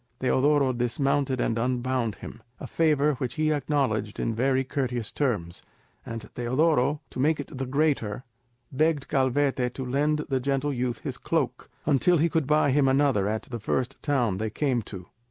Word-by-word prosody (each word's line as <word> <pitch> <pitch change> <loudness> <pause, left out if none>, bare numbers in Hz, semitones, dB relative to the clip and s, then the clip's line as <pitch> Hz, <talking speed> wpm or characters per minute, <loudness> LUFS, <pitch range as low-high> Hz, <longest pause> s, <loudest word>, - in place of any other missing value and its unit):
Teodoro 135 +1 +2
dismounted 130 +2 0
and 115 -1 0
unbound 125 -2 -1
him, 115 - -10 0.2
a - - -6
favour 150 -2 +2
which 125 -2 -3
he 155 0 +1
acknowledged 130 -8 -1
in 115 - 0
very 130 +3 +1
courteous 125 -4 -2
terms; 100 - -2 0.4
and 115 -1 -7
Teodoro, 140 +3 +1
to - - -7
make 150 +3 +2
it 145 - -7
the 135 0 -3
greater, 130 -6 0 0.5
begged 150 +1 +1
Calvete 130 -1 +1
to 130 - -4
lend 150 +4 0
the 135 -1 0
gentle 140 +2 -1
youth 125 -2 -2
his - - -5
cloak, - - -2 0.2
until 155 +5 +3
he 165 +2 +2
could 160 -4 0
buy 150 -1 +3
him 140 0 +3
another 135 -7 +2
at 110 +1 -2
the 120 -2 -6
first 125 +4 -2
town 120 -10 0
they 110 0 -1
came 125 +1 0
to. 95 -4 -9
130 Hz, 170 wpm, -26 LUFS, 120-145 Hz, 0.5 s, until